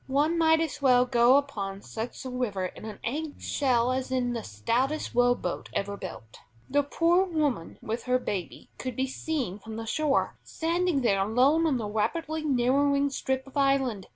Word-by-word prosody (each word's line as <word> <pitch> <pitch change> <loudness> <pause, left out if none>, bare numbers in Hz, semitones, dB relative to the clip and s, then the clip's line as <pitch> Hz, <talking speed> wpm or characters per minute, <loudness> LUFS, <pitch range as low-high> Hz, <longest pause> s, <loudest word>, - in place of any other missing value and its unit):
One 290 +5 +2
might 320 -1 +4
as 310 -3 -3
well 250 -2 +5
go 245 +1 +5
upon 200 -9 -3
such 230 +4 -6
a - - -3
river 215 -7 -2
in 185 - -8
an 215 -2 -7
egg 295 +5 -4
shell 250 -3 +1
as 260 0 -2
in 250 -2 0
the 230 - -3
stoutest 240 - -1
row 245 0 +4
boat 175 - -5
ever 200 0 -2
built. 115 - -9 0.3
The 285 +2 +2
poor 335 +5 +2
woman 300 - -1
with 225 +2 -4
her 250 0 +3
babe 195 -8 -5
could 255 -2 -4
be 260 - 0
seen 265 - -3
from 220 +1 -8
the 225 0 -5
shore, 295 +4 0
standing 335 -2 0
there 200 -5 +2
alone 260 +11 +3
on 280 -5 +1
the 225 - -3
rapidly 305 +10 -2
narrowing 280 +1 +2
strip 265 0 -2
of 270 - -15
island. 270 -8 +1
255 Hz, 180 wpm, -28 LUFS, 225-285 Hz, 0.3 s, well